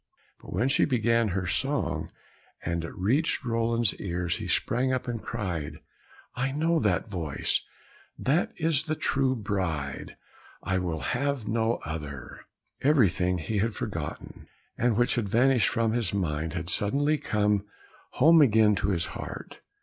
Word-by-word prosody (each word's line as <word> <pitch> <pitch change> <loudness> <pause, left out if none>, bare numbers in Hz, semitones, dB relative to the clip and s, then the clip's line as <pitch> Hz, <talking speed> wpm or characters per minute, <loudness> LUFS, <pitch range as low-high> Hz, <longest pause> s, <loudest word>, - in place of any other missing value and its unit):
But - - -12
when 110 +9 +1
she 135 - +4
began 115 -3 +2
her 95 -1 -2
song, 135 +10 0 0.6
and 85 -1 -1
it 85 - -7
reached 125 - +1
Roland's 115 -1 +1
ears, 85 -2 -1
he - - -5
sprang 130 +3 +1
up 130 0 -2
and 120 -2 -3
cried, 85 -9 -4 0.6
"I 135 +2 -1
know 160 +4 +1
the 105 -5 +2
voice, 85 -9 -2 0.6
that 145 +7 +1
is 160 -2 +1
the 155 -1 -1
true 135 -3 +1
bride, 95 - -3 0.5
I 95 0 0
will 85 -4 -3
have 135 -2 -1
no 115 +1 +1
other!" 75 -5 -7 0.4
Everything 100 - +3
he 100 +6 -2
had 110 +2 0
forgotten, - - -6 0.3
and 120 -2 +1
which 120 0 +3
had 110 -5 -1
vanished 125 0 +4
from 115 -1 +1
his 110 -4 0
mind, 80 -4 -1
had 85 -1 -3
suddenly 145 +8 +1
come 105 -1 +1 0.5
home 160 +4 +6
again 110 -5 +5
to - - -1
his 85 -5 +1
heart. - - -8
110 Hz, 150 wpm, -27 LUFS, 90-130 Hz, 0.6 s, home